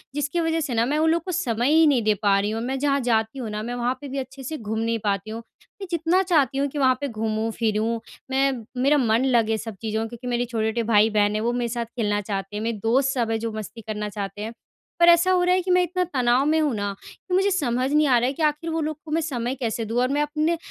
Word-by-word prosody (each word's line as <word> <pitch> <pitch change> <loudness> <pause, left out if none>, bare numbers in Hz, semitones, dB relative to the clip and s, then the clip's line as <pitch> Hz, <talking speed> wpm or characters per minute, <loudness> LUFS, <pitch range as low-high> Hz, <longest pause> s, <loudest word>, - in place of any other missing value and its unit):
जिसकी 295 +3 -1
वजह 325 0 +1
से 285 -5 -2
ना 230 0 +2
मैं 290 +4 0
उन 320 +1 +3
लोगों 330 +1 +3
को 370 - -3
समय 250 -7 0
ही 320 0 +6
नहीं 275 -5 +3
दे 215 0 +3
पा 200 -1 +4
रही 205 +1 -1
हूँ। 225 +1 -3
मैं 265 +2 -2
जहाँ 280 0 +1
जाती 220 +2 +1
हूँ 235 -4 -4
ना 210 0 -4
मैं 240 +2 -4
वहाँ 245 +1 0
पे 285 - -7
भी 275 +1 -5
अच्छे 270 0 -6
से 310 +5 -4
घूम 220 -2 -4
नहीं 230 0 0
पाती 200 0 -1
हुँ। 225 +1 -5 0.4
मैं 390 - -5
जितना 340 +2 +2
चाहती 295 -8 +2
हूँ 280 +1 +1
कि 285 - -7
वहाँ 260 -2 +4
पे 285 - -1
घूमूँ 220 -1 -2
फ़िरूँ 225 +1 0 0.3
मैं 270 +1 +3 0.3
मेरा 285 +3 +4
मन 235 -1 +2
लगे 230 -4 +2
सब 220 0 -7
चीज़ों 220 -1 -2
में 225 - -2
क्योंकि 240 +1 -9
मेरे 245 0 0
छोटे-छोटे 230 0 -1
भाई 220 -1 +4
बहन 210 -1 +2
हैं 215 - 0
वो 235 +2 +1
मेरे 240 -1 -1
साथ 235 0 -2
खेलना 215 -3 -1
चाहते 195 0 -4
हैं 210 - -3
मेरे 230 -1 -2
दोस्त 260 +4 +2
सब 235 -3 -1
हैं 225 - 0
जो 225 0 -3
मस्ती 215 +1 -7
करना 210 -1 -3
चाहते 205 0 -6
हैं। 220 +2 -5 0.5
पर 345 0 +7
ऐसा 345 +2 +5
हो 365 -1 +3
रहा 360 +1 +3
है 370 - +1
कि 365 +1 -2
मैं 360 0 +5
इतना 365 +1 -1
तनाव 255 -5 +1
में 315 +2 +3
हूँ 300 -4 +1
ना 205 -1 -2
कि 365 - -10
मुझे 385 +2 +3
समझ 260 -7 0
नहीं 300 0 +4
आ 255 -3 +5
रहा 240 +1 +2
है 265 - -1
कि 315 - -3
आख़िर 300 +2 0
वो 325 0 -1
लोग 310 -1 -3
को 305 - -8
मैं 325 +2 +1
समय 255 -5 -2
कैसे 230 -3 -3
दूँ 225 +3 -1
और 250 - +2
मैं 290 +2 +1
अपने 305 +3 0
245 Hz, 285 wpm, -24 LUFS, 220-295 Hz, 0.5 s, पर